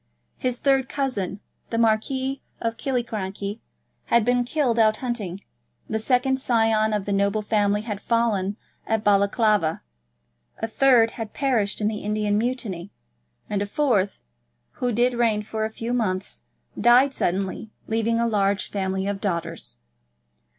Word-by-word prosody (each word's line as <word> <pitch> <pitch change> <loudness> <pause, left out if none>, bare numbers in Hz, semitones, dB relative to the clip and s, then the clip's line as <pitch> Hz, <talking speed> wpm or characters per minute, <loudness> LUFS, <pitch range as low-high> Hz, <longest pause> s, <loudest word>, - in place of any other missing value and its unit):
His 250 -1 -1
third 270 -1 +2
cousin, 210 -8 -2 0.3
the 230 - -2
Marquis 260 +4 +1 0.2
of 230 0 -2
Killiecrankie, 215 -5 -3 0.5
had 235 -2 +3
been 245 0 +3
killed 245 -3 0
out 215 -1 +4
hunting; 210 -7 -3 0.5
the 220 - -1
second 260 +3 +2
scion 225 -3 +2
of 210 -2 -1
the 200 - -1
noble 200 +2 +1
family 205 -1 +1
had 210 -2 -5
fallen 215 -4 0 0.3
at 220 -1 0
Balaclava; 200 -3 +2 0.7
a 225 - -2
third 230 -1 +4
had 225 -2 -6
perished 230 -8 +1
in 210 - +2
the 215 -1 -2
Indian 210 0 0
Mutiny; 210 -6 -2 0.6
and 205 -1 -1
a 205 - -1
fourth, 205 -6 +1 0.6
who 250 -1 +1
did 240 +3 +2
reign 230 -3 +1
for 220 +1 -2
a - - -2
few 230 +2 -4
months, 185 - -2 0.3
died 245 +5 +5
suddenly, 190 +3 -2 0.2
leaving 225 +1 +1
a 235 - +2
large 200 -3 +1
family 190 -1 -1
of 200 -1 -3
daughters. 170 - -3
220 Hz, 145 wpm, -24 LUFS, 200-240 Hz, 0.7 s, died